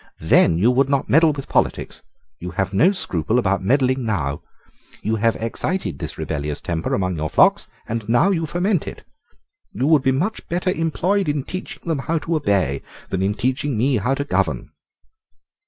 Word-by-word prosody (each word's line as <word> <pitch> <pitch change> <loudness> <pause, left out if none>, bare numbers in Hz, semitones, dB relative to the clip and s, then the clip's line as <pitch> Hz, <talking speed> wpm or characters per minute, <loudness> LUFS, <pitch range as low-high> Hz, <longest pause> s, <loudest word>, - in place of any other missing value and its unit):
Then 80 - +4
you 110 +8 +4
would 135 +2 +2
not 140 -1 0
meddle 160 +2 +5
with 140 -2 -7
politics. - - -1 0.4
You 90 - -6
have 95 0 -1
no 150 - +5
scruple 110 - -1
about 100 -5 +1
meddling 130 +3 +2
now. 75 -11 -2 0.6
You 110 +1 0
have 115 +1 +2
excited 115 - -2
this - - -5
rebellious 75 -1 -3
temper 85 -1 -2
among 90 -3 -1
your 80 0 -2
flocks, - - +4 0.2
and 115 -1 -4
now 165 +12 +4
you 165 -4 -1
foment 180 +2 0
it. - - -8 0.7
You 125 +6 -1
would 155 -2 +4
be 130 0 +1 0.3
better 180 +2 0
employed 180 +3 0
in 145 -2 -1
teaching 185 +6 -7
them 160 -4 0
how 165 +4 -1
to 165 +2 -2
obey 100 - +1 0.3
than 95 - -1
in 100 +2 0
teaching 130 +1 -1
me 130 +3 +2
how 125 +6 0
to 140 - -2
govern." 145 - -1
130 Hz, 175 wpm, -21 LUFS, 95-155 Hz, 0.7 s, meddle